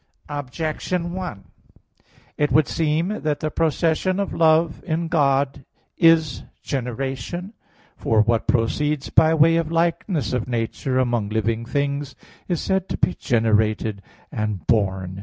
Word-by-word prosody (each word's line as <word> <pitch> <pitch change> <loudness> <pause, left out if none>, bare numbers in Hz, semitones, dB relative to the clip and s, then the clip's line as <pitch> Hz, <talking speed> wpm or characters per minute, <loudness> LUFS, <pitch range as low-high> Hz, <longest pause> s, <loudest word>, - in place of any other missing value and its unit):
Objection 155 +5 -3
1: 180 - -5 0.9
It 150 0 0
would 155 -2 +4
seem 165 +6 -1
that 150 -2 -1
the 155 0 -2
procession 165 +4 +1
of 200 - -2
love 160 0 +3
in 165 -1 -2
God 140 -4 +1 0.3
is 165 -4 +4 0.2
generation. 135 - -4 0.4
For 110 -1 +2
what 115 +1 0
proceeds 140 +5 0
by 160 0 +5
way 165 +1 +5
of 165 -1 -1
likeness 165 -2 0
of 125 -3 -1
nature 120 +2 -2
among 120 -5 0
living 110 +1 -1
things 140 0 -2 0.3
is 175 -4 -1
said 190 -1 -1
to - - -2
be 180 - +1
generated 110 -2 +1 0.3
and 105 -3 -3
born. 95 -4 0
145 Hz, 130 wpm, -22 LUFS, 115-165 Hz, 0.9 s, by